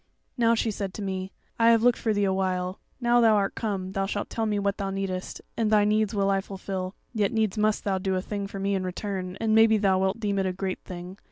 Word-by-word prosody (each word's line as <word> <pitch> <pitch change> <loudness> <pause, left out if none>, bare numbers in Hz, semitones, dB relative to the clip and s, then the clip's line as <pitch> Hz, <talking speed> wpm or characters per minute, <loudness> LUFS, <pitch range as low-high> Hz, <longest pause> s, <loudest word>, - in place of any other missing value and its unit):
"Now, 230 -2 +3
she 225 0 0
said 195 -2 -4
to 210 - -5
me, 190 0 -3 0.3
'I 230 0 +6
have 230 -1 +5
looked 245 -1 +4
for 225 - 0
thee 205 -1 +1
a 190 -1 +2
while; 185 -1 -1 0.2
now 240 -1 +4
thou 225 -2 +6
art 200 -1 +1
come, 195 -4 -3
thou 195 0 -1
shalt 205 +1 -3
tell 225 -1 -1
me 210 -1 0
what 200 0 0
thou 195 -1 -1
needest, 190 -1 -4
and 225 -2 +1
thy 210 -1 +4
needs 215 0 +1
will 200 -1 +2
I 195 0 +2
fulfil. 190 -1 -5 0.2
Yet 210 -2 +1
needs 220 -4 +1
must 215 0 +1
thou 195 -2 0
do 190 0 -1
a 185 - 0
thing 200 -1 -4
for 195 - -8
me 195 +1 0
in 190 -1 0
return, 185 0 -4
and 220 -1 +1
maybe 220 0 +6
thou 195 -2 +2
wilt 190 +3 0
deem 200 -3 0
it 190 - +1
a 185 - -1
great 190 0 -3
thing. 180 +2 -9
200 Hz, 260 wpm, -26 LUFS, 190-215 Hz, 0.3 s, I